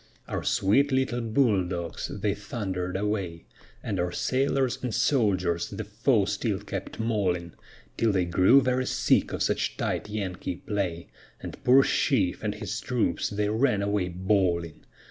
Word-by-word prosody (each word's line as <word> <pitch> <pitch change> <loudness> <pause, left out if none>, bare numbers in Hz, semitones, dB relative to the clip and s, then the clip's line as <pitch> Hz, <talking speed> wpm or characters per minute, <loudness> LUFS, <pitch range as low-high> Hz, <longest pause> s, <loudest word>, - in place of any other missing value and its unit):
Our - - -3
sweet 135 +9 +2
little 130 -2 +1
bull 110 -4 +2
dogs, 85 -1 -4
they 105 -2 -1
thunder'd 95 -3 -4
away, 95 -5 -3 0.4
And 100 -4 -2
our 90 0 0
sailors 135 +3 0
and 125 - -2
soldiers 100 - +1
the 110 - -5
foe 110 +1 +1
still 100 0 -1
kept 100 0 -6
mauling, 95 -7 -1 0.4
Till 115 -1 +2
they 95 -3 +1
grew 95 +10 +5
very 130 0 0
sick - - +2
of - - -1
such - - -1
tight - - -2
Yankee 95 -4 -4
play, 90 -4 -3 0.3
And - - -9
poor 130 +2 +6
Sheaffe 100 -12 +1
and - - -1
his - - -4
troops - - 0
then 105 0 -1
ran 120 -7 +2
away 100 -2 0
bawling. 90 -3 0
100 Hz, 150 wpm, -27 LUFS, 90-115 Hz, 0.4 s, poor